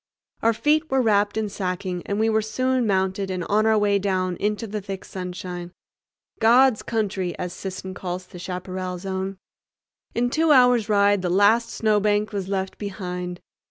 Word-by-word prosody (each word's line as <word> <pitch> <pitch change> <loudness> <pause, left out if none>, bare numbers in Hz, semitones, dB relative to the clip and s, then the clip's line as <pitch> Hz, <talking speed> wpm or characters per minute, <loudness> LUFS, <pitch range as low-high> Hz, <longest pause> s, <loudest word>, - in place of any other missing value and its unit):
Our 230 +1 +3
feet 305 +6 +1
were 265 - +2
wrapped 205 -3 +2
in 220 -1 0
sacking, 185 -2 -3
and 200 +1 -1
we 220 - +3
were 220 0 +2
soon 255 +3 0
mounted 190 0 0
and 185 -1 -2
on 215 +4 +2
our 220 -1 +4
way 205 -1 +2
down 185 -2 0
into 210 +2 -1
the 210 -1 -4
thick 195 -1 -6
sunshine—"God's 185 +7 -1
Country," 195 -5 -2
as 180 -1 -4
Sisson 190 0 -6
calls 180 0 -5
the 180 - -12
Chaparral 185 0 -4
Zone. 190 +1 -4 0.8
In 245 +1 +1
two 320 +1 +3
hours' 250 -5 +5
ride 200 -1 +4
the 180 - -1
last 205 +5 +4
snowbank 210 -1 +1
was 195 -3 -3
left 190 -1 -3
behind. 180 -3 -5
200 Hz, 160 wpm, -24 LUFS, 185-220 Hz, 0.8 s, hours